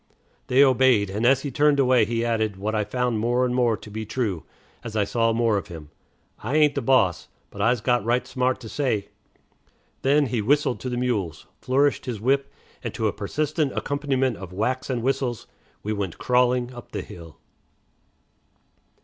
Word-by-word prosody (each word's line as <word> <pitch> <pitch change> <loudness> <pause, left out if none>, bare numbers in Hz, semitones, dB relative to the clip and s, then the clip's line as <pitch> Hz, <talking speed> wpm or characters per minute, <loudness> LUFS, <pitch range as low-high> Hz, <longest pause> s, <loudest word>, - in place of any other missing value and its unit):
They 130 +3 +5
obeyed, 130 -7 +4
and 110 +4 0
as 135 +1 +3
he 145 - -3
turned 145 +2 +3
away 125 -4 +4
he 115 +1 -1
added, 110 -4 0
what 105 +3 -3
I 105 -1 +1
found 120 +1 -1
more 120 +3 +1
and 125 - -1
more 120 -3 +2
to 105 - -12
be 110 +1 -4
true, 105 -6 -2 0.4
as 110 - -7
I 105 - +2
saw 115 +3 +1
more 115 -2 +2
of 100 - -4
him, 80 -5 -10 0.5
"I 125 +7 -3
ain't 150 -2 +4
de - - -2
boss, 100 - +2 0.2
but 100 - -7
I's 115 +1 +2
got 120 0 +1
right 120 +2 +1
smart 130 0 -1
to 115 - -8
say." 110 -6 -1 0.9
Then, 145 +2 +3
he 120 -3 -1
whistled 135 +3 +1
to 130 - -4
the 125 - -3
mules, 110 -10 -2
flourished 140 +2 +1
his 120 -4 -3
whip, 135 +5 +1 0.3
and - - -5
to - - -2
a - - -1
persistent 150 -2 -1
accompaniment 135 -4 -1
of 95 -2 -9
whacks 125 +9 -2
and 125 -3 -2
whistles 125 -3 -1 0.4
we 105 - -2
went 100 -5 -4
crawling 125 0 +1
up 120 -1 -12
the - - -3
hill. 85 -2 -12
120 Hz, 185 wpm, -24 LUFS, 110-130 Hz, 0.9 s, They